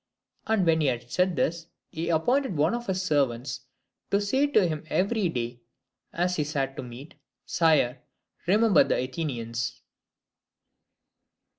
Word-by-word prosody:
And 220 -4 +2
when 160 -1 +3
he 150 - +2
had 120 -1 -2
said 180 +4 +1
this, 165 +1 -1 0.2
he 170 0 -3
appointed 205 - +1
one 155 +6 +2
of 240 -1 -4
his 190 -1 -1
servants 135 -5 -1 0.4
to 200 - +3
say 265 +8 +2
to 215 -9 +3
him 155 -2 -3
every 200 0 +1
day 120 -4 -4 0.5
as 180 +1 0
he 150 - +1
sat 140 -2 -1
at - - -5
meat, 125 +5 -10 0.3
'Sire, 140 -7 +2 0.5
remember 210 -1 +5
the - - 0
Athenians.'" 120 -4 -3
160 Hz, 140 wpm, -27 LUFS, 130-190 Hz, 0.5 s, remember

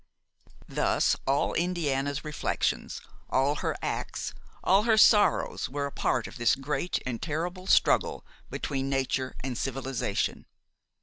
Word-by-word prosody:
Thus - - +2
all 140 +1 +2
Indiana's 145 -5 -1
reflections, 150 -2 -2 0.3
all 140 +3 +2
her - - -2
acts, - - -3 0.3
all 195 +2 +5
her 220 0 +3
sorrows 210 -1 +4
were 140 +2 -2
a 140 - -4
part 125 -3 0
of - - -9
this 120 -1 +4
great 145 +5 -2
and 120 -3 -3
terrible 175 +4 -3
struggle - - +3 0.2
between 135 -1 -3
nature 135 -1 -1
and 130 -1 -3
civilization. 135 +1 -2
140 Hz, 125 wpm, -28 LUFS, 135-170 Hz, 0.3 s, all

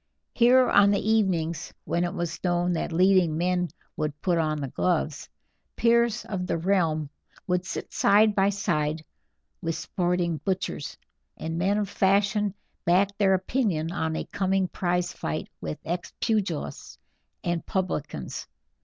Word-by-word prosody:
Here, 250 +1 +5
on 200 0 +6
the 205 +2 +1
evenings 170 -7 0
when 170 +2 0
it 175 - -2
was 170 -1 -4
known 175 0 +1
that 165 - -2
leading 180 -2 +4
men 180 0 +1 0.3
would 150 -1 -3
put 175 -3 +2
on 155 -1 0
the 140 - -3
gloves, 155 +1 -1 0.5
peers 235 -1 +2
of 185 -4 -3
the 165 - 0
realm 165 -5 +1 0.3
would 180 0 -1
sit - - -5
side 210 +2 +5
by 195 0 +3
side 160 -6 -1 0.6
with 165 -2 -2
sporting 175 -2 -1
butchers, 180 - -3 0.4
and 165 +1 -4
men 195 +3 +2
of 210 -1 0
fashion 200 +1 +2 0.3
back 195 +3 +3
their 190 -2 +4
opinion 185 -5 0
on 160 -2 -1
a - - -3
coming 190 -1 0
prize 180 -1 -1
fight 75 - -4
with 75 - -4
ex 175 +2 -3
pugilists 190 - -2 0.5
and 175 -1 -1
publicans. 155 - -3
180 Hz, 145 wpm, -26 LUFS, 165-200 Hz, 0.6 s, on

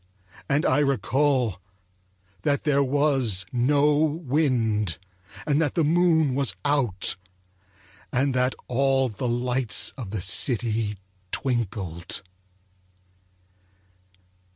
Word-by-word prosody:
And 145 +2 +1
I 130 - +3
recall 135 -5 +1 0.8
that 140 +7 0
there 140 -2 +2
was 135 -8 +1
no 145 +4 +2
wind, 130 - 0 0.5
and 150 0 +1
that 150 -4 -1
the 165 - +2
moon 160 -2 +3
was 130 -8 0
out, 125 -12 +1 0.9
and 135 +2 +1
that 125 +1 +1
all 135 +1 +1
the 110 +4 -4
lights 120 -2 0
of 115 -7 -6
the 100 -3 -4
city 105 +1 +1 0.3
twinkled. 100 - -2
130 Hz, 95 wpm, -25 LUFS, 110-145 Hz, 0.9 s, I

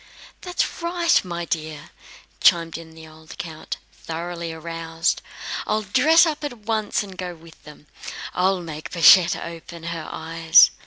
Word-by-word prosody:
"That's 360 -1 -2
right, 340 0 +2
my 175 -2 -4
dear," 155 -3 -4 0.5
chimed 165 -1 +4
in 160 -1 -9
the 160 0 -12
old 155 0 -14
count, 165 -6 -6 0.2
thoroughly 170 +1 -5
aroused. 165 +1 -2 0.5
"I'll 215 0 0
dress 285 - +5
up 310 -2 -2
at 275 -5 -4
once 215 -1 -1
and 195 -2 -10
go 180 -1 -5
with 165 0 -17
them. 150 0 -14 0.5
I'll 185 0 +1
make 155 -2 -7
Pashette 170 +1 +7
open 170 0 -8
her 165 -1 -6
eyes." 165 +1 +5
170 Hz, 145 wpm, -23 LUFS, 160-205 Hz, 0.5 s, Pashette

